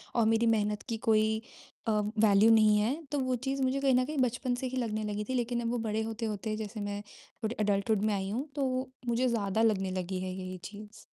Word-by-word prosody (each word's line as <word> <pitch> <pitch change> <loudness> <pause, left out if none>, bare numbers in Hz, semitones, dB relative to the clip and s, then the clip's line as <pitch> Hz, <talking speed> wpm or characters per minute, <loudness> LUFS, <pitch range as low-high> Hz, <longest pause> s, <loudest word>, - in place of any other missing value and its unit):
और 230 - +4
मेरी 225 +1 +2
मेहनत 210 0 -1
की 225 - -1
कोई 220 0 +3 0.5
अ, - - +3
वैल्यू 210 0 +4
नहीं 215 -1 +6
है। 220 +6 +2 0.2
तो 290 - 0
वो 255 -1 0
चीज़ 270 0 -1
मुझे 260 +1 +1
कहीं 270 -2 +3
न 255 0 +3
कहीं 300 +1 -5
बचपन 245 +1 0
से 255 +1 -3
ही 260 +1 -4
लगने 215 -3 -1
लगी 210 0 -2
थी, 260 - 0
लेकिन 240 -1 0
अब 230 - -1
वो 245 - 0
बड़े 215 +1 0
होते-होते 220 -1 -3
जैसे 215 0 -5
मैं 205 0 -3 0.4
थोड़े 220 +2 -1
एडल्टहुड 205 0 +1
में 215 - +2
आई 195 -1 -2
हूँ, 250 +8 -2
तो 285 - -2
वो 255 0 -1 0.2
मुझे 240 +2 +2
ज़्यादा 220 -2 0
लगने 195 -3 0
लगी 185 0 -3
है 185 0 -3
ये 185 0 -6
चीज़। 210 +1 -10
220 Hz, 230 wpm, -30 LUFS, 205-245 Hz, 0.5 s, नहीं